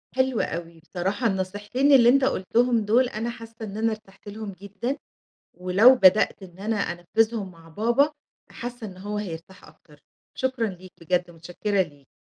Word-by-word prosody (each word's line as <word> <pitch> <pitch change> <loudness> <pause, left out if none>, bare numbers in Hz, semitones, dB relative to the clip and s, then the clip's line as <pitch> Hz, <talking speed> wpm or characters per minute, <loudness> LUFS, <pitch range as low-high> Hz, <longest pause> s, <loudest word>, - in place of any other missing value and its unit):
حلوة 260 -2 +1
أوي، 170 -1 -6
بصراحة 190 +7 -2
النصيحتين 205 +8 0
اللي 240 -3 +7
أنت 275 +1 +4
قُلتهم 235 0 +1
دُول، 245 +4 +3
أنا 230 0 -3
حاسّة 230 -1 -10
إن 205 +1 -7
أنا 225 0 +1
ارتحت 205 -1 -10
لهم 210 0 -6
جدًا 200 - -5 0.6
ولو 195 +8 +6
بدأت 195 -2 +4
إن 180 -1 -13
أنا 215 +2 -1
أنفّذهم 200 +3 0
مع 165 -1 -17
بابا، 235 - +2 0.4
حاسّة 245 -2 -7
إن 185 -2 -10
هو 205 +2 -4
هيرتاح 185 -1 -7
أكتر. - - -19 0.4
شكرًا 260 -3 0
ليك 185 0 -11
بجد، 175 +1 0
متشكِّرة 180 +4 -1
ليك. 145 -4 -12
205 Hz, 155 wpm, -25 LUFS, 185-235 Hz, 0.6 s, اللي